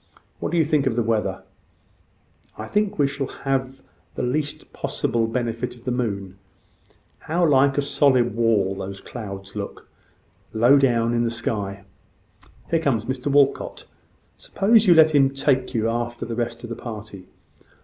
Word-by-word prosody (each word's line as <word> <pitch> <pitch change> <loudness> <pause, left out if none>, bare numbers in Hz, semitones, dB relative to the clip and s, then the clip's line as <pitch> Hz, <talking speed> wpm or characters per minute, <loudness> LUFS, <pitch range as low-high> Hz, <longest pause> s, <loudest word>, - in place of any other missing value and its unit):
What - - -3
do 175 - 0
you 160 - +4
think 150 -3 +1
of 120 - 0
the 120 - +1
weather?" 110 -1 -1 1.1
"I 110 - -5
think 210 - 0
we 145 - +3
shall 140 -1 -3
have 135 -1 -3 0.3
the - - -3
least 145 +4 -3
possible 115 -1 -1
benefit 120 +1 -3
of 120 - -18
the 125 - -2
moon. 100 -6 -3 0.8
How 170 +3 0
like 140 -1 +4
a 145 - +2
solid 130 -5 +2
wall 110 -4 +2
those 95 0 -6
clouds 100 -4 -8
look, 100 -1 -6 0.7
low 120 +6 +5
down 120 -3 +2
in 120 0 +1
the 115 - +1
sky! 100 -4 -4 0.9
Here 165 - +3
comes 125 -8 0
Mr 130 +2 -4
Walcot. 140 -1 +1 0.5
Suppose 215 +1 +2
you 175 - +7
let 160 -1 +6
him 135 -2 +5
take 135 -2 0
you 110 -1 +1
after 120 +1 -3
the 115 - -5
rest 120 0 -3
of 120 - -7
the - - -3
party? 105 -5 -9
120 Hz, 160 wpm, -23 LUFS, 115-140 Hz, 1.1 s, you